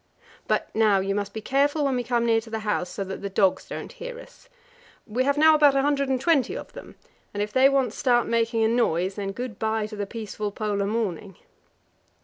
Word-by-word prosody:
But - - -1
now 215 -3 +3
you 195 +1 -1
must 200 0 -3
be 220 - -6
careful 285 +5 +1
when 270 -2 +1
we 245 - -1
come 240 0 0
near 225 -1 +3
to 225 - -13
the 220 0 -4
house, 195 -4 -1
so 200 - -4
that 190 0 -7
the 200 - -4
dogs 190 -1 +1
don't - - -7
hear - - -8
us. - - -16 0.6
We 245 +4 -1
have 280 +1 +1
now 315 +1 +6
about 295 -2 +5
a 270 - +2
hundred 280 -1 +1
and 260 -1 +1
twenty 320 - +1
of - - -10
them, - - -11 0.4
and 205 - 0
if 210 - -6
they 265 +1 +6
once 265 -5 0
start 240 -2 +2
making 230 0 +1
a - - +4
noise, 195 -6 +1
then 195 -1 -4
good 240 0 -6
bye 220 -1 0
to 215 0 -8
the 205 -1 -4
peaceful 215 -1 -5
Polar 205 -1 -2
morning. 200 -4 -3
225 Hz, 225 wpm, -25 LUFS, 205-270 Hz, 0.6 s, now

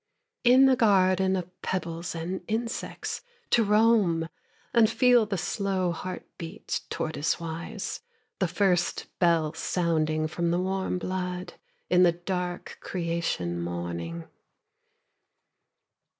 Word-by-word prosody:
In 255 +2 +7
a 265 - +5
garden 190 -5 +4
of 180 -1 -6
pebbles 170 -2 -3
and 170 +3 -3
insects 230 +2 -3 0.3
To 235 - +5
roam, 210 -6 +3 0.4
and 230 -2 +6
feel 245 -2 +4
the 200 -2 -1
slow 190 0 0
heart 185 +2 -5
beat 165 -1 -4
Tortoise 155 -1 -1
wise, 165 0 -5 0.4
the - - +2
first 180 -4 +1
bell 165 -3 +3
sounding 160 -2 0
From 170 +2 -1
the 175 +1 +1
warm 190 0 -1
blood, 180 -1 -3 0.3
in 180 0 +4
the 175 -2 +6
dark 180 0 -4
creation 165 - -2
morning. 85 -1 -4
180 Hz, 110 wpm, -27 LUFS, 165-195 Hz, 0.4 s, In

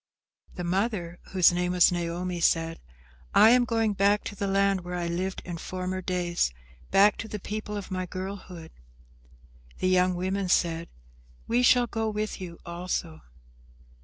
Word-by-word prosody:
The 180 - -4
mother, 180 -1 -1
whose 185 -3 +4
name 180 0 -1
was 180 0 +5
Naomi, 175 +1 -3
said, 165 0 +1 0.6
"I 220 - +8
am 245 0 +5
going 225 -3 +1
back 200 +1 +2
to 205 - -6
the 200 0 -2
land 195 -1 +2
where 180 0 -6
I 175 -1 -2
lived 180 +3 -3
in 175 -2 -6
former 185 +1 -4
days, 175 - 0 0.4
back 205 +1 +5
to 225 - -5
the 210 - -5
people 210 +1 -5
of 200 -1 -7
my 185 -1 -2
girlhood." 185 -3 -7 1.1
The 185 - 0
young 185 0 +3
women 190 +1 -2
said, 170 -1 +1 0.6
"We 240 +2 +2
shall 245 0 +5
go 225 -2 -2
with 210 -1 -3
you 170 -2 -7
also." 170 -2 -4
185 Hz, 160 wpm, -27 LUFS, 175-205 Hz, 1.1 s, I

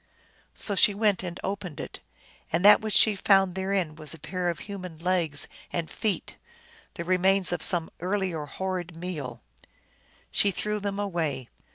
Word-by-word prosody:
So 205 - -2
she 200 +1 +4
went 210 -2 +2
and 180 -1 -6
opened 190 -6 -4
it, - - -7 0.5
and 170 +4 +1
that 210 - +8
which 215 -1 +1
she 215 -2 +7
found 195 -1 +3
therein 190 -4 -1
was 155 0 -7
a - - -15
pair 180 +3 -2
of 170 - -3
human 185 -5 -7
legs 170 -3 +3 0.2
and 170 -2 -3
feet, 205 -6 -2 0.6
the 170 - -4
remains 185 +1 +3
of 175 - -2
some 170 -3 -1
ear 185 +4 0
lier 170 -6 -3
horrid 180 +1 -4
meal. 165 -7 -6 0.9
She 205 - +5
threw 210 +2 -2
them 200 -1 -3
far 205 - -1
away. 155 -9 -2
185 Hz, 170 wpm, -27 LUFS, 165-195 Hz, 0.9 s, that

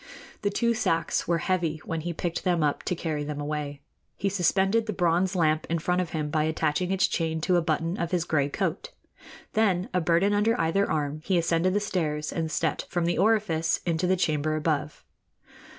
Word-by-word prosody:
The 205 - +1
two 235 +3 +1
sacks 165 -7 0
were 170 0 +2
heavy 170 -2 0
when 165 -1 -3
he 175 +2 -3
picked 170 0 -3
them 175 -4 +2
up 145 -1 0
to 180 - 0
carry 155 -3 -3
them 145 0 -5
away. 145 -1 -4 0.4
He 200 - 0
suspended 195 +4 +2
the 215 - -1
bronze 180 +2 +1
lamp 155 -3 +1
in 170 - +1
front 180 +3 0
of 175 - -3
him 150 -2 -3
by 155 0 +1
attaching 160 +3 0
its 190 -1 +3
chain 160 -1 -1
to 180 +3 +2
a 175 - +4
button 165 +2 -1
of 170 -1 -1
his 180 -2 0
gray 145 -4 +1
coat. 180 +2 -2 0.6
Then, 195 -5 +2
a 180 - +2
burden 170 +5 +2
under 220 +3 +2
either 195 +5 +1
arm, 150 0 -1
he 185 0 +1
ascended 170 +2 +1
the - - +3
stairs 155 -7 -2
and 165 -1 -2
stepped 160 -2 -1
from 175 -1 -1
the 175 - 0
orifice 195 -6 +2
into 170 +1 0
the 185 +1 +2
chamber 155 -3 0
above. 150 -1 -2
170 Hz, 200 wpm, -27 LUFS, 155-185 Hz, 0.6 s, a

